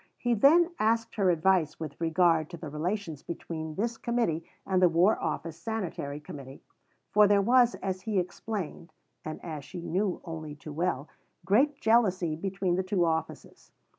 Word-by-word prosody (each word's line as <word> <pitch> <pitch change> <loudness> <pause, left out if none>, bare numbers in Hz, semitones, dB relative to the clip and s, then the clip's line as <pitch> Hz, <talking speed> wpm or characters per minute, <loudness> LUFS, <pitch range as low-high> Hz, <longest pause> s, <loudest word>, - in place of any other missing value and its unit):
He 240 -1 0
then 325 - +5
asked 225 +1 +1
her 200 -4 +2
advice 170 -2 +2
with 155 -1 -7
regard 165 -1 +3
to 170 - -8
the 155 -1 -7
relations 165 0 -3
between 160 -2 -6
this 230 +3 -2
Committee 230 -10 0 0.2
and 185 -1 +1
the 180 - +6
War 175 +6 +3
Office 160 +1 -3
Sanitary 170 -7 -4
Committee, 140 -3 -10 0.5
for 210 0 +6
there 200 0 +4
was, 245 +2 +4
as 185 -1 -2
he 210 +1 -2
explained 180 -1 -4 0.3
(and 155 - -6
as 155 -4 -5
she 175 +6 -8
knew 185 +2 -1
only 160 -3 -6
too 145 +1 -9
well), 155 -3 -1 0.4
great 275 +9 +3
jealousy 185 -8 +2
between 190 +1 -1
the - - +2
two 185 -2 +1
offices. 160 -1 -4
180 Hz, 165 wpm, -29 LUFS, 160-210 Hz, 0.5 s, the